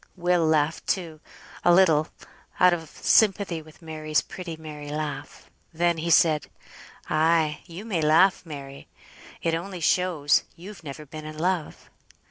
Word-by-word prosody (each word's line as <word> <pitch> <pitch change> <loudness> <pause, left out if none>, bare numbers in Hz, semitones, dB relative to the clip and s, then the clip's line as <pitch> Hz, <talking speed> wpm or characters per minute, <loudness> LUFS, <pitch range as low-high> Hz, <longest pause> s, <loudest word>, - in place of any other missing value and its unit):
Will 175 -2 +1
laughed, 155 0 +1
too, 165 -5 -2 0.4
a - - +5
little, 165 -4 +4 0.5
out 180 -1 +6
of 165 -3 -4
sympathy 195 -6 +2
with 155 +2 -18
Mary's 155 -1 -1
pretty 175 -3 -7
merry 150 -2 -9
laugh. 150 0 -6 0.2
Then 170 0 +1
he 170 +2 -3
said 160 -2 +4 0.6
"Ay, 155 -1 +2
you 180 +5 -9
may 190 -8 -1
laugh, 160 +5 +4
Mary; 140 -4 -9 0.6
it 165 - +1
only 180 +3 -4
shows 165 -3 +2
you've 180 0 -11
never 150 +1 -8
been 155 +2 -9
in 155 0 -8
love." 175 -1 -2
160 Hz, 140 wpm, -25 LUFS, 155-175 Hz, 0.6 s, out